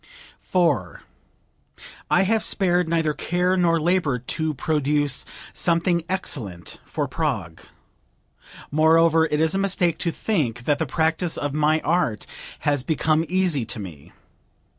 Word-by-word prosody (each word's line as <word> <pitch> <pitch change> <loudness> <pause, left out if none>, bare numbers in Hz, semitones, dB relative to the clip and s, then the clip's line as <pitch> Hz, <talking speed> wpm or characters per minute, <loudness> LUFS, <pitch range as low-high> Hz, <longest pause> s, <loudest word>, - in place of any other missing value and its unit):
4. 145 - 0 1.1
"I 180 - +4
have 220 +2 +1
spared 180 -3 +1
neither 160 -2 +1
care 180 +4 0
nor 170 -2 +2
labor 165 -5 +1
to 155 +5 -2
produce 145 -1 0 0.3
something 170 0 +1
excellent 115 - -4
for 145 -3 -2
Prague. 120 - -3 1.1
Moreover 160 +1 +4
it 150 -1 -1
is 160 0 +2
a 195 - 0
mistake 185 -4 +1
to 170 - 0
think 140 - -2
that 145 -1 +1
the 160 - -1
practice 160 +4 0
of 145 -1 -3
my 155 +1 +2
art 165 -12 0 0.4
has 145 -2 +1
become 155 +2 +1
easy 180 -7 +2
to 110 0 -4
me. 85 -8 -10
160 Hz, 130 wpm, -23 LUFS, 145-175 Hz, 1.1 s, I